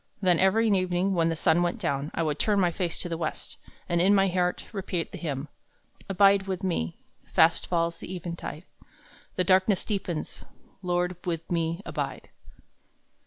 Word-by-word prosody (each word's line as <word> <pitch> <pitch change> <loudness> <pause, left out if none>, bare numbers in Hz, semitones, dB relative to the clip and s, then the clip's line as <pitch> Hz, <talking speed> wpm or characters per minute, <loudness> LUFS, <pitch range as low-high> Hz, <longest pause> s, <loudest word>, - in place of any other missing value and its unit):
Then 180 -4 +3
every 210 +4 +4
evening 185 -1 +1
when 165 -2 +2
the 165 - -1
sun 160 +2 +3
went 175 0 0
down, 140 +1 -2
I 165 - 0
would 150 -2 -1
turn 210 -2 +2
my 180 -2 +3
face 170 0 -2
to - - -2
the 165 -1 -4
west, 155 - -4 0.3
and 175 -1 +2
in 195 +3 +5
my 195 -1 +4
heart 180 0 0
repeat 190 -5 -3
the - - -7
hymn: 145 -3 -3 0.6
"'Abide 195 0 +4
with 190 0 -3
me: 85 - -1 0.4
fast 160 +1 +4
falls 170 -1 0
the - - -8
eventide; 170 -2 -6 0.7
The 185 - +1
darkness 190 +1 +3
deepens: 190 -7 -3 0.4
Lord, 180 -1 0
with 165 -2 -4
me 165 +2 -1
abide.' - - -4
175 Hz, 165 wpm, -27 LUFS, 165-190 Hz, 0.7 s, in